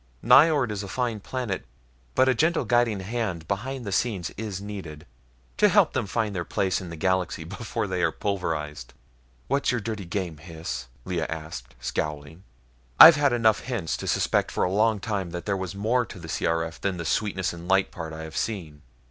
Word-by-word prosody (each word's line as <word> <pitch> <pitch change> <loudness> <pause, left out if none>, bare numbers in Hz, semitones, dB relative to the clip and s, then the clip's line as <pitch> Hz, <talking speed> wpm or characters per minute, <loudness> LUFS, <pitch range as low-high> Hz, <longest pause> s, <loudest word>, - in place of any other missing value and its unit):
Nyjord 135 0 +6
is 105 -1 -3
a 100 - -6
fine 120 +1 -2
planet, 120 -2 -3 0.5
but 130 0 +4
a 130 - +5
gentle 160 +7 +1
guiding 120 -5 +2
hand 95 -6 -3
behind 120 +5 -3
the 100 - -4
scenes 95 -4 -1
is 105 -3 -5
needed, 95 -7 -8 0.5
to - - +5
help - - +4
them - - -1
find 110 0 -1
their 85 - -1
place 95 +2 0
in 90 - -7
the 85 - -6
galaxy 95 +1 0
before - - -4
they - - -2
are - - +2
pulverized." 80 -10 -3 0.5
"What's 140 0 +1
your 125 - 0
dirty 110 -3 -4
game, 85 -4 -4
Hys?" 80 -5 -6 0.2
Lea 90 -3 -2
asked, 80 -6 -7
scowling. 75 +6 -4 0.6
"I've 165 - +12
had 145 -2 +3
enough 110 -4 +3
hints 115 -11 -3
to - - -6
suspect - - +1
for - - -1
a 90 - +1
long 110 +1 +2
time 100 -4 -2
that 85 0 -6
there 100 - 0
was 95 0 -4
more 115 +5 +1
to - - -10
the 85 -2 -9
C.R.F. 80 +1 -1
than 95 -2 -1
the 85 - -5
sweetness 95 -1 0
and 85 0 -9
light 95 0 +3
part 80 -2 -6
I 80 0 -7
have 80 -3 -9
seen. 80 -10 -3
95 Hz, 195 wpm, -26 LUFS, 85-115 Hz, 0.6 s, I've